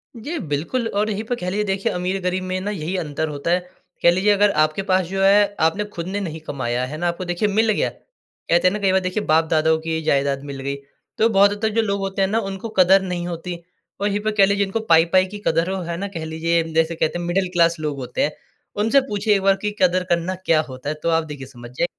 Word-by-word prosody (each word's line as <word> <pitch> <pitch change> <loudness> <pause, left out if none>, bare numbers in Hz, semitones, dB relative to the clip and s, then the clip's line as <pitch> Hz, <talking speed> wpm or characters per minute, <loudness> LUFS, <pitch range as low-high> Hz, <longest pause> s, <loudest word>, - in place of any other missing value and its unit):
जी 290 +9 -5
बिल्कुल, 170 - -1
और 210 0 -1
यहीं 210 +1 -2
पर 245 +2 -2
कह 180 -4 -4
लीजिए 210 +3 -1
देखिए 195 -1 -1
अमीर-गरीब 185 0 -2
में 185 0 -2
ना 205 +2 -3
यही 180 -1 -4
अंतर 160 -2 -2
होता 145 +3 -3
है। 180 - +3 0.4
कह 170 - +7
लीजिए 190 +4 +2
अगर 205 0 +4
आपके 155 +5 -1
पास 185 -2 +2
जो 195 +1 -2
है 205 +1 +4
आपने 205 +6 -2
खुद 170 +1 -5
ने 200 +2 -2
नहीं 160 -4 -5
कमाया 125 -2 -2
है 150 +4 -6
ना 175 +1 -1
आपको 170 +2 -3
देखिए 175 +4 0
मिल 220 +2 +2
गया। - - 0
कहते 185 - -2
है 185 - +2
ना 210 - -2
कई 195 -2 +2
बार 190 - +3
देखिए 185 +3 -2
बाप 160 +1 +3
दादाओं 160 0 +3
की 160 0 -1
जायदाद 140 -2 +1
मिल 135 - -7
गई 140 +1 -3 0.4
तो 225 +1 +4
बहुत 200 -1 +5
हद 205 +1 -6
तक 220 - +2
जो 225 - +4
लोग 200 -2 -1
होते 195 0 -2
हैं 190 - +3
ना 220 - +1
उनको 195 +4 -6
कदर 190 +2 +6
नहीं 180 -2 -3
होती। 175 +1 -5 0.5
और 205 - +2
यहीं 205 0 0
पे 215 - +3
कह 200 -2 +5
लीजिए 200 0 +1
इनको 195 +4 -2
पाई-पाई 170 +3 +5
की - - -4
कदर 165 +3 +1
वो 190 -1 -2
है 170 - -3
ना 200 +2 -3
कह 160 - -4
लीजिए 165 +1 0 0.2
जैसे 165 +1 +1
कहते 160 +2 -1
हैं 175 - -4
मिडल 180 +2 0
क्लास 170 -2 +3
लोग 150 -2 -3
होते 125 - -2
हैं 150 - +1 0.5
उनसे 250 +5 +4
पूछिए 205 +1 +2
एक 195 - 0
बार 195 0 +4
की 210 - 0
कदर 185 0 +3
करना 175 +2 -1
क्या 165 -4 +2
होता 130 +2 -6
है? 155 - -2
तो 165 +2 -3
आप 165 0 +2
देखिए 145 -3 -8
समझ 120 -2 -12
जे - - +3
185 Hz, 260 wpm, -21 LUFS, 160-200 Hz, 0.5 s, कह